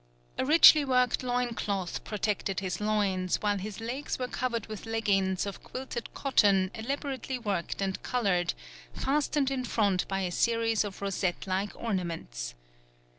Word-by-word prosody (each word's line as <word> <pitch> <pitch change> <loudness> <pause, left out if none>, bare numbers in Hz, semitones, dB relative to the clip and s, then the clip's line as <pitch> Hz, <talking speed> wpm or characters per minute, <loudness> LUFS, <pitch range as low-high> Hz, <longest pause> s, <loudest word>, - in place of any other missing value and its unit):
A - - +2
richly 310 -1 +8
worked 250 -2 +2
loin 245 -1 0
cloth 195 -4 -3
protected 205 -2 -1
his 190 0 -3
loins, 200 -4 +1
while 205 -1 0
his 205 +2 -6
legs 245 +6 -3
were 250 - -2
covered 235 -4 -2
with 215 0 -8
leggings 195 -5 +1
of 200 - -6
quilted 255 -3 -6
cotton 195 -8 +3
elaborately 265 +2 -3
worked 200 -5 -2
and 190 -1 -2
coloured, 195 -8 0 0.4
fastened 285 -1 0
in 260 -2 -1
front 200 -6 +1
by 195 0 -1
a 180 -2 -1
series 230 +2 +2
of 200 -1 -7
rosette 190 -2 -1
like 195 +2 -2
ornaments. 165 - -4
210 Hz, 145 wpm, -29 LUFS, 190-250 Hz, 0.4 s, richly